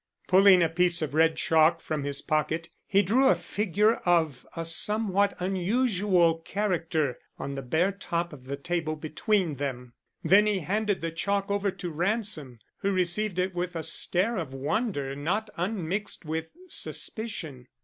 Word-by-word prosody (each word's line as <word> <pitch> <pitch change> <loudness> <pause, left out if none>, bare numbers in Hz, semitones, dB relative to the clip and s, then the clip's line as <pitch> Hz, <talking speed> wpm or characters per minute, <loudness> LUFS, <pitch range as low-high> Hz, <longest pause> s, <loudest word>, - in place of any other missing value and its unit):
Pulling 190 -1 +7
a - - +4
piece 175 0 +2
of 150 - -4
red 160 +1 +4
chalk 160 +1 +3
from 155 -3 -3
his 140 -1 -3
pocket, 155 +2 -1 0.2
he 200 +1 +4
drew 245 +8 +3
a 185 - +5
figure 205 +5 +1
of 160 -7 +1
a 165 -1 -3
somewhat 200 +3 +1
unusual 185 -2 +2
character 165 - -1 0.2
on 140 - -5
the 135 - -4
bare 160 +9 +1
top 175 -4 -3
of 130 -3 -12
the 140 +1 -4
table 160 +1 -2
between 160 +1 0
them; 125 -3 -4 0.3
then 205 +2 +5
he 205 -3 +1
handed 205 +3 -1
the 165 0 -2
chalk 200 +4 -1
over 200 0 +1
to 180 -2 -5
Ransom, 175 - -1 0.2
who 200 - 0
received 185 +2 0
it 185 +1 0
with 175 0 -3
a 165 - -3
stare 200 +9 +1
of 145 -7 -4
wonder 145 - -1
not 200 +10 -2
unmixed 190 +1 -3
with 160 +1 -3 0.2
suspicion. 165 - -6
175 Hz, 160 wpm, -27 LUFS, 155-200 Hz, 0.3 s, Pulling